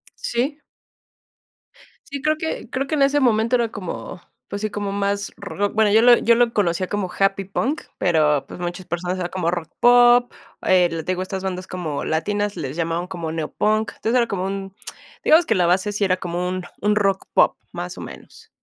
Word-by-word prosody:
Sí. 270 +6 -2 1.5
Sí, 280 -1 -6
creo 305 +1 +1
que 315 -7 -4
creo 270 +2 -2
que 310 - -1
en 285 - +3
ese 280 +1 +3
momento 230 -2 +3
era 235 -2 +1
como, 185 -3 -7 0.3
pues, 200 - -5
sí, 215 - -1
como 205 -1 -3
más 200 0 -1
rock, 200 0 -3
bueno, 215 -1 +3
yo 220 +2 +6
lo 240 0 +7
yo 235 +1 +4
lo 240 0 +3
conocía 185 -2 0
como 195 -2 -3
happy 195 0 +1
punk, 255 +10 -2 0.2
pero, 150 -5 +2
pues, - - -10
muchas 175 +1 -5
personas 175 +2 -2
eran 175 -1 -2
como 175 -2 -1
rock 170 -3 -4
pop, 245 0 +6 0.3
el 175 -3 +2
te - - 0
digo, 185 0 -2
estas 190 0 -4
bandas 185 -1 -4
como 160 -6 -4
latinas 205 +6 -1
les 145 -5 -5
llamaban 170 +1 -2
como 170 -4 -5
neo 160 -2 -4
punk, 215 +1 +1
entonces 225 +3 -1
era 235 -1 +3
como 190 -3 -2
un, 195 0 -4 0.5
digamos, 325 +2 +5
que 225 - +1
la 180 -2 +3
base 190 +4 +2
sí 205 0 -2
era 185 -2 +2
como 175 0 -3
un 185 0 -3 0.2
un 210 +1 +2
rock 195 -2 +1
pop, - - +4 0.2
más - - -6
o - - -7
menos. - - -12
195 Hz, 205 wpm, -22 LUFS, 180-225 Hz, 1.5 s, lo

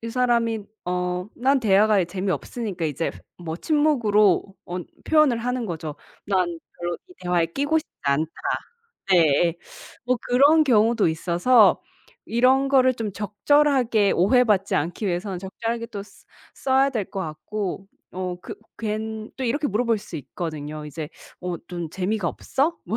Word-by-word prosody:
이 230 - -5
사람이 235 -2 +1 0.2
어 180 0 -2
난 270 +3 +2
대화가 210 -3 +4
재미없으니까 190 +1 -3
이제 155 +1 -1 0.3
뭐 165 -2 -5
침묵으로 220 - +3 0.2
어 175 - -4 0.3
표현을 305 -7 +4
하는 250 0 -2
거죠. 160 -4 -5 0.3
'난 190 -3 +2 0.3
별로 175 0 -3
이 360 - -16
대화에 175 -2 +1
끼고 285 - 0
싶지 315 - -9
않다.' 145 +3 +1 0.8
네예. 170 -1 +4 0.5
뭐 255 +1 +2
그런 285 +6 +5
경우도 230 - +3
있어서 175 +8 +4 0.4
이런 260 +4 +3
거를 260 -2 +4
좀 225 -4 -4
적절하게 225 +1 +2
오해받지 205 0 +3
않기 175 +7 -2
위해서는 180 +1 -2
적절하게 230 +5 -4
또 210 -4 -6
쓰 - - -20 0.3
써야 270 +1 +2
될 225 -7 -1
것 - - -5
같고. 190 +4 -4 0.3
어 180 -1 -3
그 - - -8 0.2
괜 220 0 -4
또 265 - -5
이렇게 290 +5 0
물어볼 230 0 +1
수 200 - -12
있거든요. 150 +1 -6
이제 150 +1 -6 0.3
"어 180 -1 -3
좀 175 -3 -5
재미가 190 +1 -1
없어?" 300 - -1
뭐 220 - -2
210 Hz, 285 characters per minute, -24 LUFS, 175-245 Hz, 0.8 s, 그런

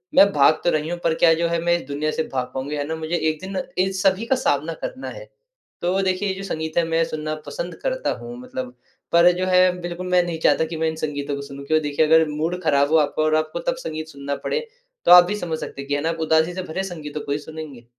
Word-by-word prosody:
मैं 200 0 +7
भाग 145 +2 +4
तो 175 - +3
रही 155 0 -1
हूँ 175 0 -3
पर 165 - +2
क्या 165 - +7
जो 170 +1 +1
है 170 0 0
मैं 175 0 +4
इस 130 - -12
दुनिया 150 +2 -1
से 160 - -1
भाग 125 -1 -2
पाऊँगी? 135 +3 -3
है 145 - -1
ना 160 - -2
मुझे 160 +1 -3
एक 155 -2 0
दिन 190 0 -5 0.3
इन 190 - -2
सभी 195 +3 +2
का 265 +3 +2
सामना 160 - 0
करना 260 - -6
है। - - -9 0.6
तो 180 +3 +1
देखिए 185 +2 0
ये - - 0
जो 195 - -7
संगीत 160 -4 -4
है 170 - +5
मैं 165 0 +2
सुनना 155 0 -4
पसंद - - -5
करता - - -1
हूँ 240 +1 -8
मतलब 255 0 -6 0.4
पर 170 +1 +6
जो 185 - 0
है 185 0 +5 0.2
बिल्कुल 175 +1 -5
मैं 180 0 +4
नहीं 170 -2 -4
चाहता 160 - +3
कि 160 0 -6
मैं 160 0 0
इन 160 - -5
संगीतों 145 -2 -3
को 140 - -5
सुनूँ 140 0 -9
क्योंकि 155 +2 +2
देखिए 145 +2 +2
अगर 160 +1 +5
मूड 165 +4 -2
खराब 145 -2 +3
हो 160 - +6
आपका 150 +1 +1
और 155 0 +2
आपको 155 +2 -1
तब 255 - 0
संगीत 155 -9 -5
सुनना 140 -2 -5
पड़े। 465 - 0 0.5
तो - - +5
आप 180 0 +11
भी 205 +4 -2
समझ 165 -5 -3
सकते 140 - -6
हैं 140 - -9
कि 145 - +1
है 145 - -1
ना 160 - 0
आप 165 0 -3
उदासी 160 +2 +2
से 185 - -3
भरे 180 +2 -3
संगीतों 155 -5 -6
को 140 - -4
ही 145 - +1
सुनेंगे। 150 -6 -9
160 Hz, 270 wpm, -22 LUFS, 150-180 Hz, 0.6 s, आप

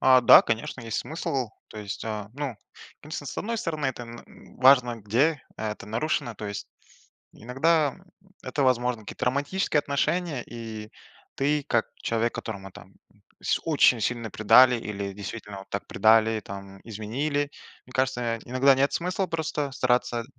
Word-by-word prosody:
А, 130 -1 +6
да, 120 - +9
конечно, 115 +2 -3
есть 115 -2 -3
смысл, 135 -6 -3 0.2
то 110 - -10
есть, 105 -1 -6
э, 105 -2 -4
ну, 140 -5 -4 0.4
конечно, 150 -1 -7
с - - -5
одной 230 +2 -2
стороны 155 -9 -2
это 125 -2 -3
н 120 0 -13
важно 125 -2 +6
где, 125 +9 +1
это 105 -1 -5
нарушено, 120 +1 -1
то 105 - -8
есть 100 -1 -5 0.7
иногда 145 +5 +1 0.5
это, 140 +3 -2
возможно, 125 -2 +1
какие-то 105 - -6
романтические 145 +7 0
отношения, 145 0 -1
и 110 -2 -8 0.5
ты 145 +1 +1
как 120 -2 +2
человек, 115 +1 -1
которого 95 -3 -6
там - - -14 0.5
с - - +1
очень 145 -7 +4
сильно 115 0 -2
предали 125 +5 +6
или 100 -3 -5
действительно 100 -1 -7
так - - -4
предали, 110 0 +4
там, 100 -1 -10
изменили, 135 +7 -2 0.4
мне 125 - -15
кажется, 125 -3 0
иногда 130 +2 +4
нет 140 +2 +2
смысла 180 +2 -1
просто 155 -4 -2
стараться 125 -2 +1
125 Hz, 145 wpm, -26 LUFS, 110-140 Hz, 0.7 s, да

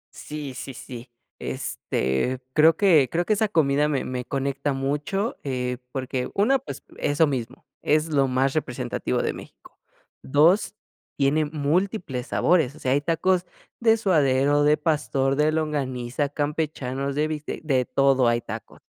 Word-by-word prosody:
Sí 150 -3 -7
sí 130 +1 -7
sí, 125 0 -9 0.3
este, 65 - -2
creo 160 +2 +5
que 160 - +5
creo 175 +1 0
que 215 - +2
esa 215 +1 +1
comida 150 -4 +2
me 145 -3 -1
me 125 -1 -4
conecta 140 +1 -2
mucho, 145 - -2
eh, 125 -2 -3
porque, 130 -1 -3
1, 255 +7 +3
pues 265 - -8
eso 145 +3 +2
mismo, 130 -6 -4 0.2
es 155 +2 +1
lo 140 -3 +2
más 130 +1 +1
representativo 140 -6 -2
de - - -1
México, - - -14 0.4
2, 170 +8 +3 0.4
tiene 145 +2 +2
múltiples 150 - -1
sabores, 160 -6 +2
o - - -14
sea, 130 - -1
hay 140 - +3
tacos 175 +3 +1 0.3
de 225 -1 +4
suadero, 145 -8 +3
de 150 +1 +4
pastor, 140 -3 0
de 150 +1 +2
longaniza, 140 -4 -2
campechanos, 145 -2 -2
de 150 +1 +1
bistec, 155 0 -5
de 130 -4 +1
todo 135 -2 +3
hay 120 0 +2
tacos. - - -8
145 Hz, 150 wpm, -24 LUFS, 130-160 Hz, 0.4 s, creo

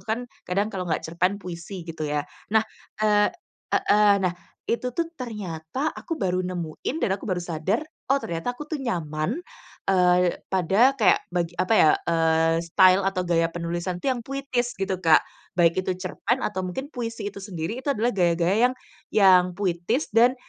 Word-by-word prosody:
tuh - - -23
kan, - - -5 0.3
kadang 200 +4 0
kalau 185 -3 -4
nggak 160 - -1
cerpen, 180 +4 0
puisi 180 -1 -7
gitu 160 -2 -5
ya. 145 0 -1 0.3
Nah, 220 0 +4 0.4
eee 210 -1 +4 0.4
heeh, 210 -1 +4
nah, 180 -2 +1 0.4
itu 250 +1 -1
tuh 335 -1 -1
ternyata 210 - -4
aku 330 - -5
baru 185 - -1
nemuin 180 - -4
dan - - +1
aku - - -9
baru 180 -3 -1
sadar, 175 - -1 0.3
"oh - - +4
ternyata 170 +9 -3
aku 300 - -7
tuh 310 - -2
nyaman, 155 - -2 0.5
eee, 180 -1 +3
pada 195 +9 +3
kayak 225 - +5 0.2
bag 170 -1 +1
apa 185 +4 +2
ya, 155 - +6 0.2
eee, 165 -1 +3
style 185 +3 +5
atau 195 -1 0
gaya 165 -1 +2
penulisan 175 +1 -3
tuh 265 +4 +1
yang 240 - -5
puitis, 270 -3 -2
gitu, 195 -1 -1
Kak. 160 -2 +7 0.4
Baik 170 +2 +4
itu 185 - -1
cerpen, 205 +6 -1
atau 190 -3 -2
mungkin 185 +10 -4
puisi 230 -3 -4
itu - - -7
sendiri, 190 +4 -4
itu 285 - -1
adalah 235 0 +1
gaya-gaya 180 +6 +3
yang - - -7 0.4
yang 190 -3 +6
puitis, 195 - 0
dan 240 +3 +5
185 Hz, 175 wpm, -25 LUFS, 170-230 Hz, 0.5 s, Kak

